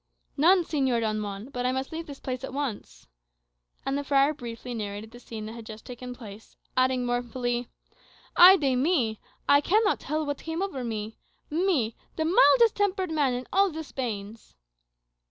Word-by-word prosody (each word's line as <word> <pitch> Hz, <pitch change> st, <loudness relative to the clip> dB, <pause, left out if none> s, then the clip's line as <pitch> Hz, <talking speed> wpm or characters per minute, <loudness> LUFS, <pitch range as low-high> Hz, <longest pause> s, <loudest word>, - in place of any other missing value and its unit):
"None, 345 Hz, +5 st, +5 dB
Señor 265 Hz, -7 st, 0 dB
Don 215 Hz, -1 st, -1 dB
Juan. 205 Hz, +3 st, -6 dB
But 250 Hz, -2 st, -2 dB
I -, -, +2 dB
must 265 Hz, +1 st, -3 dB
leave 325 Hz, +1 st, -5 dB
this 280 Hz, -2 st, -9 dB
place 255 Hz, 0 st, -4 dB
at 265 Hz, -, -6 dB
once." 215 Hz, -, -5 dB, 0.8 s
And 270 Hz, -, 0 dB
the 285 Hz, -, -1 dB
friar 280 Hz, +1 st, +3 dB
briefly 245 Hz, -3 st, -7 dB
narrated 210 Hz, 0 st, -5 dB
the 240 Hz, -, -12 dB
scene 225 Hz, -3 st, -7 dB
that 220 Hz, -, -7 dB
had 230 Hz, -1 st, -10 dB
just 215 Hz, -1 st, -10 dB
taken 250 Hz, 0 st, -8 dB
place, 220 Hz, -3 st, -12 dB, 0.2 s
adding 255 Hz, -1 st, +2 dB
mournfully, 245 Hz, 0 st, -2 dB, 0.7 s
"Ay 370 Hz, +2 st, +10 dB
de 275 Hz, -6 st, +1 dB
mi! 250 Hz, -6 st, +1 dB, 0.3 s
I 285 Hz, 0 st, +6 dB
cannot 415 Hz, +6 st, +2 dB
tell 310 Hz, +2 st, -2 dB
what 285 Hz, -1 st, -3 dB
came 325 Hz, +3 st, -3 dB
over 280 Hz, -10 st, -4 dB
me 220 Hz, -2 st, -5 dB, 0.3 s
me, 310 Hz, -, +1 dB, 0.2 s
the 320 Hz, -, -1 dB
mildest 465 Hz, +5 st, +5 dB
tempered 385 Hz, -3 st, 0 dB
man 285 Hz, -5 st, +1 dB
in 250 Hz, +1 st, -4 dB
all 395 Hz, +1 st, +4 dB
the 320 Hz, -1 st, -6 dB
Spains!" 225 Hz, -, -6 dB
255 Hz, 175 wpm, -27 LUFS, 230-315 Hz, 0.8 s, Ay